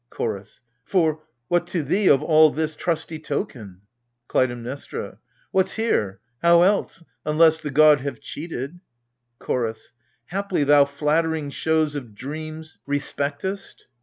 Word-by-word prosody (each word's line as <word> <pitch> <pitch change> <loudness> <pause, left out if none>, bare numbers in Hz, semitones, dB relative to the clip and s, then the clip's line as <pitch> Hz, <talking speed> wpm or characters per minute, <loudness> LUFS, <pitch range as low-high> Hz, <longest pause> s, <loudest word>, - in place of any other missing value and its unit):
CHORDS. 105 -2 -5 0.2
For 160 -3 +1
— 120 0 -52
what 175 +2 +1
to 175 -3 -2
thee, 190 +8 +2
of 135 - +5
all 155 -1 +6
this, 155 +1 -2
trusty 160 -1 -2
token? 110 - -5 0.5
KLUTAIMNESTRA. 125 +2 -2 0.3
What's 190 0 +2
here! 105 - 0 0.2
how 170 0 +6
else? 195 -3 +1 0.2
unless 160 +1 +4
the 150 - -4
god 150 0 +6
have 140 +1 -4
cheated 155 0 -6 0.6
CHORDS. 115 -3 -3 0.4
Haply 195 -3 -1
thou 145 0 +6
flattering 150 +1 0
shows 160 0 +1
of 125 -8 -7
dreams 155 +5 -7
respectest? 145 +6 -3
155 Hz, 125 wpm, -23 LUFS, 140-165 Hz, 0.6 s, all